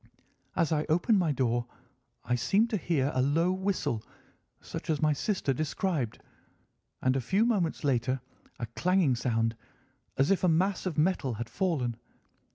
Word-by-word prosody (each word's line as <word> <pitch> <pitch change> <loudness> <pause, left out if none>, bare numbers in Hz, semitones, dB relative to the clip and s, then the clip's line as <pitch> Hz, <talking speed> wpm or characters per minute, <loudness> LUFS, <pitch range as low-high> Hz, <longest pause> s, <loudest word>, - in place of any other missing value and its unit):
As 170 -2 +1
I 155 -1 +1
opened 175 +6 +3
my 170 -4 +2
door 120 -3 0 0.6
I - - 0
seemed 200 - +2
to 215 - +1
hear 150 -6 0
a 130 - +2
low 160 +7 +2
whistle, 185 - -1 0.6
such - - -7
as 155 -2 +1
my 155 -1 +3
sister 145 -2 0
described, 155 - -2 0.8
and 130 0 +3
a 135 - +1
few 195 - +2
moments 195 -11 0
later 130 -1 +1 0.4
a 120 - -3
clanging 170 - +2
sound, 115 -2 0 0.6
as 135 +7 +3
if 195 - +2
a - - +5
mass 185 +4 +1
of 170 - -3
metal 150 -7 +1
had 115 +1 -6
fallen. 135 -11 -1
155 Hz, 160 wpm, -29 LUFS, 125-185 Hz, 0.8 s, a